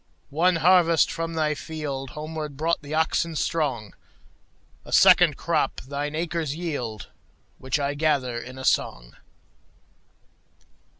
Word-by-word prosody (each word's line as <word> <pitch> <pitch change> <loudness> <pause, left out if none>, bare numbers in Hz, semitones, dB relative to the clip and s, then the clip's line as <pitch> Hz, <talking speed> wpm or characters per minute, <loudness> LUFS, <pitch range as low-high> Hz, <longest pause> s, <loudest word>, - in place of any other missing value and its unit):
One 175 +5 +3
harvest 170 -1 +4
from 165 0 -4
thy 155 -1 +1
fieldHomeward 150 0 -6
brought 165 +3 0
the 150 +1 -5
oxen 160 +1 0
strong;A 135 - -6
second - - +6
crop - - -1
thine 145 +3 -4
acres 165 -3 -2
yield, 135 -11 -5 0.5
Which 130 +3 -1
I 140 0 -1
gather 145 -5 0
in 130 +2 -10
a 130 - -6
song. - - 0
150 Hz, 110 wpm, -25 LUFS, 135-165 Hz, 0.5 s, second